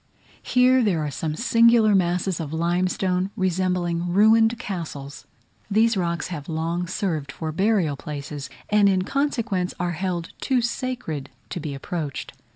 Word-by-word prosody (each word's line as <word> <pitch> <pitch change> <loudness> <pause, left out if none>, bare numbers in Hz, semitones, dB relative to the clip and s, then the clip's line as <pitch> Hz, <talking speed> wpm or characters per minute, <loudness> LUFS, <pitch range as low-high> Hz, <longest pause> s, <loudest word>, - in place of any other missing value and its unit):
Here 255 +1 +4
there 175 -9 +1
are 145 - -3
some 155 +3 -3
singular 230 0 +5
masses 180 -1 +1
of 155 -3 -4
limestone, 180 +3 0
resembling 180 -2 0
ruined 225 +4 +5
castles. 155 -9 -6 0.4
These 220 +2 +3
rocks 170 -4 -1
have 155 -4 -6
long 165 +2 -2
served 165 -7 -2
for 160 -1 -4
burial 190 -4 +1
places, 140 -1 -6 0.2
and 205 -1 +5
in 185 -1 +2
consequence 230 -8 -1
are 175 0 0
held 175 0 -3
too 260 -2 +2
sacred 235 - -3 0.2
to - - -3
be 150 -3 -5
approached. 150 0 -5
180 Hz, 140 wpm, -24 LUFS, 160-210 Hz, 0.4 s, singular